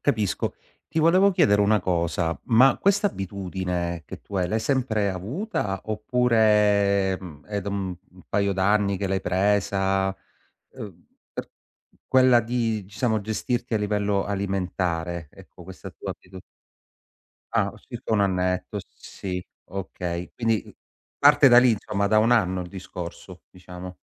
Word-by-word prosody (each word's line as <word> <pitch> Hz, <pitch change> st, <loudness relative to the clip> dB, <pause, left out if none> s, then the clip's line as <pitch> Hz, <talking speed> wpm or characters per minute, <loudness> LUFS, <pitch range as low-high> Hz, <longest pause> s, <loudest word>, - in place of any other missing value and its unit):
capisco. 110 Hz, -9 st, 0 dB, 0.3 s
Ti 160 Hz, -, -1 dB
volevo 185 Hz, +5 st, +5 dB
chiedere 105 Hz, -, +4 dB
1 105 Hz, +1 st, +3 dB
cosa. 85 Hz, -1 st, -1 dB
Ma 125 Hz, +3 st, +5 dB
questa 200 Hz, +1 st, +3 dB
abitudine 90 Hz, -, -4 dB
che -, -, -9 dB
tu 100 Hz, -, -7 dB
hai, 90 Hz, -1 st, +1 dB
l'hai 110 Hz, +5 st, -1 dB
sempre 110 Hz, -5 st, 0 dB
avuta? 100 Hz, -, -3 dB
Oppure, 105 Hz, -4 st, +2 dB
mhmm, 80 Hz, -6 st, -11 dB
è 105 Hz, -1 st, -3 dB
d 95 Hz, -, -11 dB
mhmm, 95 Hz, -3 st, -3 dB, 0.2 s
un 90 Hz, -, -17 dB
paio 100 Hz, 0 st, +1 dB
d'anni 100 Hz, +1 st, +2 dB
che 100 Hz, +1 st, -2 dB
l'hai 95 Hz, 0 st, 0 dB
presa? 95 Hz, 0 st, +1 dB, 0.6 s
Uhm, 100 Hz, -8 st, -9 dB, 0.3 s
t -, -, -6 dB, 0.6 s
quella 130 Hz, -2 st, +5 dB
di 115 Hz, -3 st, -2 dB
diciamo, 110 Hz, +1 st, 0 dB
gestirti 115 Hz, +3 st, -2 dB
a -, -, +2 dB
livello 105 Hz, -1 st, 0 dB
alimentare, 90 Hz, -4 st, -2 dB
ecco, -, -, -15 dB
questa -, -, -10 dB
tua -, -, -7 dB
abitu 95 Hz, +1 st, -14 dB, 1.1 s
Ah, -, -, +1 dB
circa -, -, -5 dB
1 105 Hz, -, +3 dB
annetto, 90 Hz, -2 st, 0 dB, 0.2 s
sì, 90 Hz, -2 st, -6 dB, 0.2 s
okay. 90 Hz, -2 st, -5 dB
Quindi 115 Hz, -2 st, -1 dB, 0.4 s
parte 145 Hz, -1 st, +7 dB
da 120 Hz, -, +8 dB
lì, 125 Hz, 0 st, +6 dB
insomma, 100 Hz, -1 st, -1 dB
da 110 Hz, +1 st, +4 dB
1 115 Hz, +3 st, +4 dB
anno 95 Hz, -6 st, +2 dB
il 90 Hz, -, -9 dB
discorso, 90 Hz, 0 st, -9 dB
diciamo. 90 Hz, 0 st, -10 dB
100 Hz, 140 wpm, -25 LUFS, 90-110 Hz, 1.1 s, da